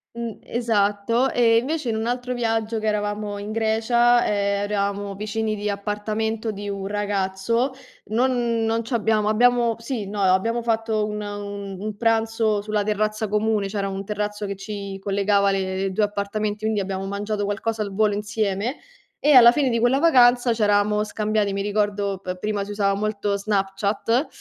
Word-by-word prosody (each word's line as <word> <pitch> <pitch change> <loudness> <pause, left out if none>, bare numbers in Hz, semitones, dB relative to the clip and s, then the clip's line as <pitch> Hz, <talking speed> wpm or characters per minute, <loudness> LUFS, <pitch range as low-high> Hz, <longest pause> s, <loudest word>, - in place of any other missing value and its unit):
Mhmm, 235 -2 -5
esatto. 230 +1 +1
E 230 -2 +4
invece 280 +1 -1
in 220 - 0
un 220 - -2
altro 245 +1 -2
viaggio 225 -1 -1
che 220 - -5
eravamo 205 -1 -1
in 205 +1 -6
Grecia, 230 +2 +3
ehm, 200 -1 0
eravamo 200 -1 -2
vicini 215 +1 -2
di 210 0 -3
appartamento 215 +2 -2
di 205 0 -6
un 195 -1 -4
ragazzo, 205 +4 -1 0.3
non 235 0 +1
non 225 +1 0
ci 240 - -5
abbiamo 220 -2 +1
abbiamo 235 +1 +3
sì, 230 -3 -4
no, 205 0 -4
ehm, 185 - +4
abbiamo 230 +6 +1
fatto 225 -2 0
una 210 -1 -4
un 200 -1 -6
un 210 0 -5
pranzo 225 -2 +1
sulla 210 0 -1
terrazza 215 +1 -1
comune. 210 -1 0
C'era 195 -1 -2
un 195 0 -5
terrazzo 210 0 -3
che 200 - -4
ci 200 -1 -6
collegava 200 0 +2
le 190 0 -1
i 190 - -1
due 210 +3 +1
appartamenti, 205 +1 -2
quindi 215 -1 0
abbiamo 195 0 -3
mangiato 205 +1 -2
qualcosa 220 +2 -2
al 200 -2 -3
volo 215 -1 +3
insieme 210 +3 -2 0.4
e 295 - +3
alla 240 -2 +9
fine 280 -4 +1
di 230 -1 +1
quella 245 +3 +3
vacanza 245 -6 +5
c'eravamo 210 -1 +2
scambiati, 215 -1 -1
mi 200 - -2
ricordo 205 -1 -1
p 185 -1 -5
prima 205 +1 -2
si 205 - -8
usava 200 -1 +1
molto 205 0 -1
Snapchat, 200 +5 0
210 Hz, 170 wpm, -23 LUFS, 200-225 Hz, 0.4 s, alla